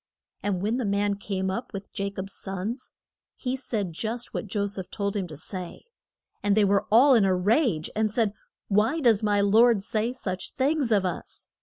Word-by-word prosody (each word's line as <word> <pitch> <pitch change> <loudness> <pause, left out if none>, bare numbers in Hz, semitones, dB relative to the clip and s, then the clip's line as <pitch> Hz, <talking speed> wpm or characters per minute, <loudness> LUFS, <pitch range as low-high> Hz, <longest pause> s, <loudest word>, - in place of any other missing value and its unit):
And 195 -3 -1
when 220 +4 +1
the 255 - -1
man 200 0 +1
came 190 -2 -2
up 235 +5 -5
with 195 0 -6
Ja 200 0 -2
cob's 195 0 -6
sons, 195 +6 -5 0.4
he 255 -1 -2
said 215 -9 -3
just 225 +7 -4
what - - -3
Jo 200 +1 -1
seph 195 -2 -5
told 200 -1 -2
him 195 -3 -1
to 155 -3 -9
say. 180 +2 -6 0.6
And 205 0 +2
they 210 - +5
were 200 0 +2
all 260 +6 +7
in 230 -5 +5
a 190 -1 +3
rage, 200 - +2
and 215 0 +1
said: 215 -2 +1 0.3
Why 220 +10 +2
does 230 -7 +4
my 205 -1 +2
lord 220 +1 +5
say 220 +3 -1
such 190 -7 -4
things 275 -2 +1
of 200 -3 +3
us? 180 - -5
205 Hz, 195 wpm, -26 LUFS, 195-230 Hz, 0.6 s, all